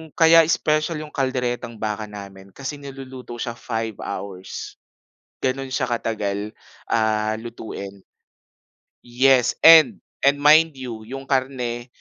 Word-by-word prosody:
kaya 165 0 +6
special 155 0 +1
'yung 150 - -11
kalderetang 125 -3 -2
baka 105 -1 -4
namin 100 -2 -11
kasi 140 +1 -6
niluluto 130 -3 -9
siya 120 0 -4
5 115 -2 -5
hours. 95 -2 -7 0.6
Gano'n 135 +1 -1
siya 130 -1 -1
katagal, 105 -3 -3 0.3
ah, 110 -1 +1
lutuin. 110 -3 -8 1.0
Yes 125 0 +3
and 160 -4 +8 0.2
and 140 +1 +4
mind 155 +2 +5
you, 120 -4 -8
'yung 135 +2 -7
karne, 130 -3 -2
120 Hz, 115 wpm, -22 LUFS, 110-135 Hz, 1.0 s, and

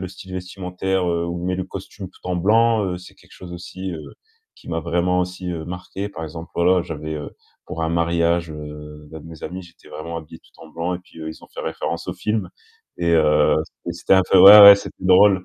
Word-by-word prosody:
le 95 - -5
style 95 0 -12
vestimentaire, 90 +1 -3
heu, 85 0 -1
où 85 0 -5
on - - -4
met 90 0 -1
le 95 - -3
costume 95 +1 -9
tout - - -23
en 90 - -1
blanc, 110 +4 +3
heu, 90 -1 -3
c'est 90 - -13
quelque - - -23
chose 90 -1 -11
aussi, 95 +2 -7
heu, 80 -2 -9 0.4
qui - - -17
m'a 80 - -2
vraiment 90 +2 0
aussi, 90 0 -4
heu, 80 -2 -5
marqué 90 +3 -6
par 100 -5 -9
exemple, 80 +2 -9
voilà, 90 +1 +3
j'avais, 80 -1 -6
heu, 75 -1 -6 0.4
pour 80 - -5
un 80 - 0
mariage, 85 0 0
heu, 75 0 -10
d'un 80 - -8
de - - -14
mes 80 -2 -12
amis, 95 +1 -6
j'étais 85 -2 -18
vraiment 85 +2 -7
habillé 80 0 -10
tout - - -24
en 80 - -13
blanc 85 +3 -3
et - - -5
puis, 90 - -18
heu, 80 0 -6
ils 80 - -10
ont - - -15
fait - - -7
référence 85 - -4
au 90 - -3
film 105 +3 -2 0.5
et 85 0 0
heu, 75 -2 +3
c'était 85 - -9
c'était 90 +2 +2
un 95 - +5
peu 95 - +6
ouais, 100 +3 +11
ouais, 100 0 +11
c'était 100 - -9
drôle. 95 0 +5
85 Hz, 240 wpm, -21 LUFS, 80-95 Hz, 0.5 s, ouais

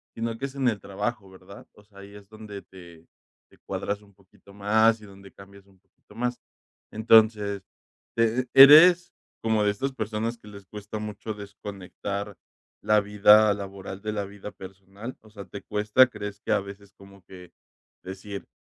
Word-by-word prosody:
sino 115 0 -3
que 135 - -4
es 140 0 -8
en 135 -2 0
el 110 -4 0
trabajo, 100 +1 -5
¿verdad? 95 +1 -15
O 105 - -20
sea, 100 -1 -18
ahí 100 +1 -13
es 100 -1 -14
donde 110 -2 -10
te 85 -4 -16 0.4
te - - -23
cuadras 100 0 -4
un 100 -1 -22
poquito 100 0 -21
más 110 +3 +2
y - - -12
donde 100 -1 -15
cambias 100 0 -16
un 95 -1 -25
poquito - - -24
más. 125 +1 -2 0.5
Entonces, 110 -2 +3 0.5
te 115 +2 +1
¿eres 165 +6 +8 0.3
como 110 -1 +1
de 105 - +3
esas 135 +7 -4
personas 110 0 -3
que 105 - -18
les 100 -1 -12
cuesta 105 +2 -8
mucho 105 +1 -6
desconectar 100 -1 -7 0.4
la 105 0 +3
vida 105 +1 +5
laboral 100 -1 -8
de 110 0 -4
la 105 -1 -2
vida 100 +1 -10
personal? 95 +5 -11
O 110 - -19
sea, 100 -2 -11
¿te 100 +2 -9
cuesta? 105 +5 +3
¿Crees 105 -3 -8
que - - -4
a - - +3
veces 100 0 -12
como 100 -1 -18
que 90 -2 -14 0.5
decir, 95 +2 -8
105 Hz, 175 wpm, -25 LUFS, 100-110 Hz, 0.5 s, eres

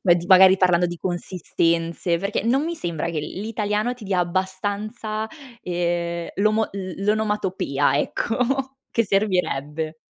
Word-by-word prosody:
Ma 180 - +6
di 175 0 -3
magari 190 0 +8
parlando 180 -2 +3
di 175 0 -5
consistenze, 170 -1 -1
perché 200 +3 -2
non 260 +5 +2
mi 340 +1 -2
sembra 170 - -3
che 160 -2 -2
l 150 - -6
l'italiano 215 +2 -1
ti 245 -3 -12
dia 190 -2 0
abbastanza, 205 +5 -2 0.4
ehm, 170 -1 -2
l'omo 215 +2 +2
l 190 -1 -6
l'onomatopea. 195 -10 +1
Ecco. 260 - -1
Che 230 - +2
servirebbe. 165 -6 0
190 Hz, 135 wpm, -23 LUFS, 170-215 Hz, 0.4 s, magari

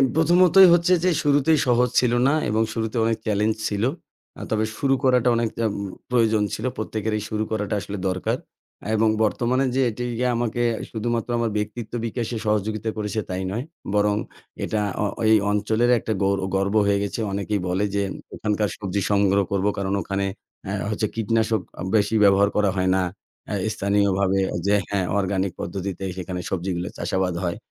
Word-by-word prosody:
প্রথমতই 180 +3 +6
হচ্ছে 175 +1 +4
যে 185 - +4
শুরুতেই 145 +2 +3
সহজ 125 0 +3
ছিল 120 -1 +2
না 140 - +3 0.2
এবং 110 +1 +1
শুরুতে 110 0 -2
অনেক 115 -1 +1
চ্যালেঞ্জ 105 +1 +1
ছিল। 105 0 -2 0.6
আ - - -7
তবে 110 0 +1
শুরু 135 -1 +2
করাটা 125 -2 +4
অনেক 115 -1 +1 0.2
আ - - +4 0.4
প্রয়োজন 110 -3 +3
ছিল। - - -4
প্রত্যেকের 110 0 -3
এই 105 - -4
শুরু 110 -1 -1
করাটা 105 -1 -1
আসলে 100 +1 -6
দরকার। 95 0 -1 0.6
এবং 110 0 +3
বর্তমানে 125 +5 +1
যে 135 - +3
এটি 120 +2 -5 0.3
আমাকে 120 0 -1 0.3
শুধুমাত্র 115 +1 -2
আমার 115 -1 0
ব্যক্তিত্ব 105 +2 -4
বিকাশে 115 +1 -3
সহযোগিতা 105 +1 0
করেছে 105 0 -2
তাই 95 0 -3
নয়। 115 +5 -2 0.3
বরং 105 0 +3 0.5
এটা 110 - -1 0.2
অ - - +1 0.3
এই - - +7 0.2
অঞ্চলের 110 +3 +1
একটা 110 - -2
গৌর 100 0 +2 0.2
গর্ব 100 +2 0
হয়ে 100 0 +2
গেছে। 100 - -4
অনেকেই 100 +1 -1
বলে 90 +3 0
যে 100 - +1 0.3
ওখানকার 105 -1 -1
সবজি 100 -1 -2
সংগ্রহ 100 -1 +3
করব, 100 -1 0
কারণ 100 -1 -1
ওখানে 100 +2 -2 0.4
আ - - -2 0.2
হচ্ছে - - -1
কীটনাশক 110 -1 +1 0.3
বেশি 105 +1 +2
ব্যবহার 100 0 +5
করা 105 -2 +3
হয় 95 0 +2
না। - - +2 0.5
আ - - -1 0.2
স্থানীয়ভাবে 100 -1 +1 0.3
যে, 105 - +4
হ্যাঁ, 100 -2 0
অর্গানিক 95 -1 -1
পদ্ধতিতে 95 +1 -4
সেখানে 90 0 -4
সবজিগুলো 90 -1 -2
চাষাবাদ 95 -1 -1
হয়। 85 -1 -2
105 Hz, 165 wpm, -23 LUFS, 100-115 Hz, 0.6 s, এই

